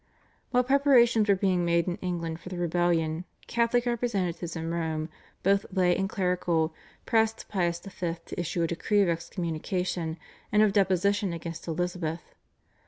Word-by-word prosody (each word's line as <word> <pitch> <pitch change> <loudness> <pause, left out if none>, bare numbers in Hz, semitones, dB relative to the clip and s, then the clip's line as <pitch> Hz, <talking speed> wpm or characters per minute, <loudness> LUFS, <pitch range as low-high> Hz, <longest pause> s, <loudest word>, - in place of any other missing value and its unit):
While 250 0 +3
preparations 250 -5 +4
were 200 - +6
being 185 -2 +1
made 170 -1 +2
in 180 - -1
England 170 -3 -3
for 180 - -9
the 185 - -5
rebellion, 170 -1 +1 0.2
Catholic 235 +1 +1
representatives 195 -8 -1
in 165 0 -3
Rome, 160 -1 -2 0.3
both 200 +1 +3
lay 180 -2 +3
and 195 0 -1
clerical, 175 -4 0 0.3
pressed 225 -1 +1
Pius 175 -4 0
V. 175 -3 -4
to - - -6
issue 175 0 -1
a - - +3
decree 205 +5 +2
of 185 - +1
excommunication 170 0 -2 0.3
and 210 +1 +5
of 205 -2 +3
deposition 195 0 +2
against 165 0 -6
Elizabeth. 170 -1 -2
180 Hz, 150 wpm, -28 LUFS, 170-200 Hz, 0.3 s, were